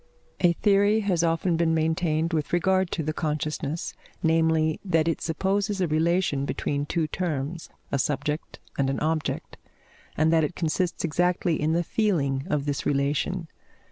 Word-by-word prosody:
A 175 -1 +4
theory 205 +3 +3
has 190 -5 +1
often 165 +1 +1
been 165 -1 +2
maintained 160 0 0
with 155 0 -1
regard 190 +1 +2
to 160 - -2
the 155 +1 -2
consciousness; 155 0 -2 0.3
namely, 160 -1 +2
that 165 -5 +2
it 165 - 0
supposes 195 +5 0
a 180 - +2
relation 160 -2 +1
between 145 +1 -2
two 165 0 0
terms 160 -1 -3 0.2
a 140 - +1
subject 145 +3 -2 0.2
and 135 -1 +2
an 135 - -1
object, 155 0 -2 0.6
and 155 +2 +3
that 160 -1 +4
it 150 - -2
consists 175 +2 -1
exactly 175 0 +1
in 155 +2 +1
the 170 +1 +2
feeling 150 -10 0
of 145 -2 0
this 145 -1 -2
relation. 145 +5 0
160 Hz, 155 wpm, -26 LUFS, 150-175 Hz, 0.6 s, A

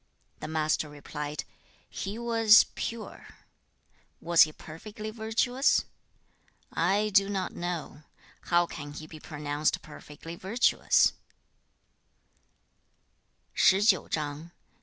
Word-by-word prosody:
The - - -6
Master 155 -1 0
replied, 150 0 -6 0.4
'He 200 +3 -5
was 230 -2 +6
pure.' 230 -1 -7 0.8
'Was 170 0 +4
he 155 - +6
perfectly 210 +8 -9
virtuous?' 230 +4 +1 0.9
'I 200 +5 +1
do 195 0 +4
not 195 -2 -3
know. 170 -4 -5 0.4
How 175 0 +3
can 145 -3 -8
he 155 - -8
be 155 0 -11
pronounced 150 0 -2
perfectly 155 +2 -10
virtuous?' 205 +8 +2
175 Hz, 85 wpm, -28 LUFS, 155-215 Hz, 0.9 s, was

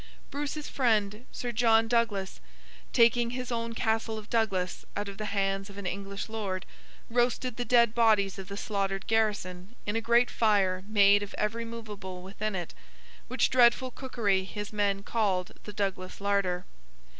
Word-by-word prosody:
Bruce's 290 +1 -4
friend 220 -3 +1
Sir 245 - -4
John 225 -1 +4
Douglas, 225 -5 0 0.5
taking 235 0 +4
his 250 0 -4
own 230 0 -2
Castle 225 -1 0
of 215 0 -10
Douglas 195 -6 0
out 205 0 -2
of 200 0 -8
the 215 - -3
hands 195 -1 -1
of 200 - -12
an 200 - -6
English 195 +2 -4
Lord, 200 -4 -3 0.4
roasted 245 +1 0
the 245 - -3
dead 235 -3 +4
bodies 215 -5 +3
of 190 - -7
the 200 0 -6
slaughtered 195 -2 -2
garrison 205 -2 -1
in 205 - -2
a 225 - +1
great 235 +2 +3
fire 195 -4 +2
made 205 -1 +5
of 205 - -6
every 225 +2 -1
movable 205 -5 -7
within 200 +2 -4
it; 175 -3 -4 0.5
which - - +1
dreadful 250 +1 +4
cookery 220 -8 0
his 205 +2 -6
men 200 -1 0
called 195 -5 0
the 210 - -6
Douglas 195 -2 -3
Larder. 200 -3 0
210 Hz, 160 wpm, -29 LUFS, 195-230 Hz, 0.5 s, made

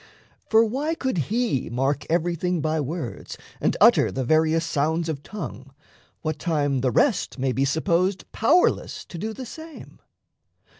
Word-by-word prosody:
For 225 +1 +5
why 285 +8 -1
could 255 - -2
he 225 - 0
mark 135 +4 -1
everything 175 +1 0
by 155 0 0
words 145 - -5 0.2
And - - 0
utter - - +6
the 130 - -2
various 160 +4 +2
sounds 160 +2 0
of 150 -4 -3
tongue, 140 -9 -8 0.5
what 155 -2 -2
time 145 -6 0
The 130 - +2
rest 220 - +1
may 130 0 0
be 135 +2 +1
supposed 175 +6 +1
powerless 310 +11 +2
To 170 - -9
do 220 +4 -3
the 255 +4 -7
same? 320 +4 -11
160 Hz, 150 wpm, -24 LUFS, 140-215 Hz, 0.5 s, utter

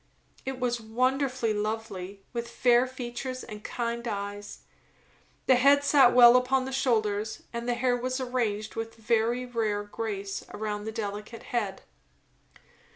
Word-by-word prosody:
It 265 -1 -3
was 240 -2 -1
wonderfully 255 +1 0
lovely; 210 -3 -4
with 235 -1 -3
fair 245 +1 +3
features 255 0 -5
and 210 -2 -9
kind 235 0 -3
eyes; 205 -1 -5 0.8
the 255 - +5
head 280 +3 +5
sat 275 -3 +6
well 240 -1 +9
upon 255 +1 +3
the 265 - -5
shoulders, 220 -5 0
and 235 +1 -3
the 240 - +2
hair 245 0 +2
was 255 +2 -2
arranged 230 -5 -2
with 225 0 -4
very 230 +2 +1
rare 220 -4 -1
grace 205 -2 -4
around 210 0 -4
the 220 - -3
delicate 215 +1 -5
head. 210 -5 -1
235 Hz, 140 wpm, -28 LUFS, 215-250 Hz, 0.8 s, well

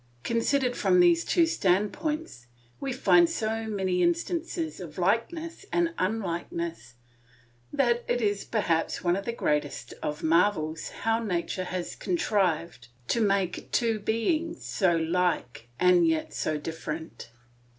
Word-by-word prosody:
Considered 245 +2 +1
from 185 -2 +3
these 170 -1 +5
two 340 - +3
standpoints, 210 - -1 0.3
we 275 - -3
find 330 +6 +4
so 225 -7 -2
many 190 -4 0
instances 335 -1 -1
of 170 -5 -9
likeness 275 - -1
and 340 -1 +1
unlikeness 170 - -3 0.8
that 240 -3 +2
it 240 0 +1
is 205 -3 0
perhaps 170 -7 0
one 175 0 +3
of 200 +1 -4
the - - -1
greatest 145 - -2
of 150 0 -4
marvels 160 -2 +2
how 225 +1 +2
nature 185 -2 -2
has 180 -1 -4
contrived 175 -2 -1 0.2
to 235 - +1
make 195 -4 0
two 230 -2 +1
beings 310 - -1
so 185 -4 +2
like 165 -6 -1
and 180 -2 +5
yet 160 -1 0
so 155 - -1
different. 160 -2 -6
195 Hz, 130 wpm, -27 LUFS, 170-235 Hz, 0.8 s, these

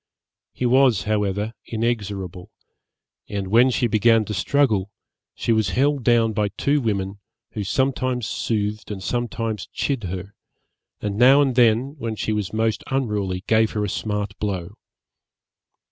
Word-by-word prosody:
He 125 - -3
was 125 -6 +4
however 105 0 -1
inexorable; 100 -6 -3 0.8
and 100 -2 -3
when 120 +5 +5
she 125 - +1
began 115 0 +3
to 105 - -4
struggle, 105 -1 +1 0.5
she - - -1
was 110 -4 +2
held 140 0 +2
down 115 -2 +3
by 105 -1 +1
two 140 +8 0
women, 100 -3 -2 0.3
who 105 - -4
sometimes 130 +2 0
soothed 105 -1 -2
and 100 -3 -6
sometimes 115 -3 -2
chid 135 -7 -2
her, 95 +2 -6 0.7
and 105 -1 -3
now 130 +3 +7
and 140 -3 +3
then, 120 +4 +3
when 115 -3 -3
she 110 - -2
was 105 -3 -2
most 110 0 0
unruly, 105 -8 -1
gave 110 0 +2
her 105 - -1
a - - -3
smart 105 0 -3
blow. 95 -3 -3
110 Hz, 145 wpm, -22 LUFS, 100-120 Hz, 0.8 s, now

